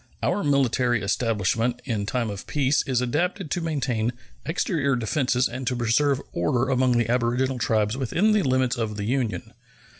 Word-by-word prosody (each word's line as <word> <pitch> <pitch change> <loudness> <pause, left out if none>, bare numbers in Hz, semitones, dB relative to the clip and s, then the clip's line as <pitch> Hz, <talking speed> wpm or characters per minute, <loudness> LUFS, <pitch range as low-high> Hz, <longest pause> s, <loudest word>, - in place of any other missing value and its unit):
Our 205 - +1
military 125 -5 +2
establishment 115 +3 0
in 105 -6 -2
time 120 -3 -1
of 100 0 -8
peace 140 -1 +2
is 125 -2 +1
adapted 150 +5 -1
to 175 - -1
maintain 130 -8 -1 0.3
exterior 155 -4 0
defenses 125 +1 +1
and 130 +1 -6
to 130 - +1
preserve 125 +4 +2
order 130 -2 0
among 130 -2 +2
the 115 -2 +1
aboriginal 125 +2 0
tribes 110 -1 +1
within 165 - +1
the 210 -1 +3
limits 130 -4 +1
of 110 -2 -3
the 100 - -3
Union. 125 -1 -2
125 Hz, 160 wpm, -24 LUFS, 115-140 Hz, 0.3 s, the